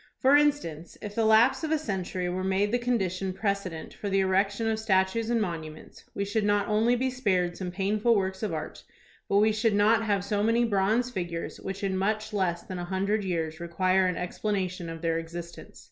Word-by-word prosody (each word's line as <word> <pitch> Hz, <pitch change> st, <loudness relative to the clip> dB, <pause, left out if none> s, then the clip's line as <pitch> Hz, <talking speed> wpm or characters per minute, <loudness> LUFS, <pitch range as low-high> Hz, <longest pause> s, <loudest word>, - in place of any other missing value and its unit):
For 270 Hz, +1 st, +5 dB
instance, 285 Hz, -, +1 dB
if 205 Hz, -1 st, -7 dB
the 225 Hz, +1 st, +1 dB
lapse 220 Hz, +7 st, +5 dB
of 315 Hz, -, -1 dB
a 315 Hz, -, +2 dB
century 190 Hz, -, -3 dB
were 185 Hz, +1 st, -2 dB
made 195 Hz, +2 st, +1 dB
the 245 Hz, -, +1 dB
condition 195 Hz, -6 st, -1 dB
precedent 195 Hz, -4 st, -3 dB
for 205 Hz, -, -5 dB
the 195 Hz, 0 st, +2 dB
erection 195 Hz, +3 st, +1 dB
of 220 Hz, -1 st, 0 dB
statues 215 Hz, +1 st, +1 dB
and 235 Hz, -1 st, +2 dB
monuments, 160 Hz, -6 st, -6 dB
we 200 Hz, -, -1 dB
should 210 Hz, +2 st, -1 dB
not 205 Hz, -1 st, +2 dB
only 220 Hz, +3 st, +3 dB
be 260 Hz, +1 st, 0 dB
spared 185 Hz, -8 st, 0 dB
some 185 Hz, -2 st, -4 dB
painful 205 Hz, +5 st, +1 dB
works 190 Hz, -1 st, -1 dB
of 215 Hz, -4 st, -2 dB
art, 155 Hz, -1 st, -6 dB, 0.5 s
but 200 Hz, -, +3 dB
we 215 Hz, +2 st, +5 dB
should 215 Hz, 0 st, +1 dB
not 215 Hz, +2 st, +4 dB
have 205 Hz, -3 st, 0 dB
so 205 Hz, 0 st, 0 dB
many 230 Hz, +2 st, +3 dB
bronze 220 Hz, +4 st, +1 dB
figures 175 Hz, -5 st, -4 dB
which 195 Hz, +1 st, -6 dB
in 195 Hz, -1 st, 0 dB
much 215 Hz, +3 st, -1 dB
less 180 Hz, -4 st, 0 dB
than 185 Hz, -1 st, -6 dB
a 175 Hz, -, -4 dB
hundred 195 Hz, +3 st, 0 dB
years 165 Hz, -3 st, -2 dB
require 185 Hz, +2 st, +1 dB
an 180 Hz, -, -1 dB
explanation 185 Hz, -2 st, -3 dB
of 165 Hz, 0 st, -8 dB
their 165 Hz, 0 st, +1 dB
existence. 170 Hz, +1 st, -9 dB
195 Hz, 205 wpm, -27 LUFS, 180-220 Hz, 0.5 s, For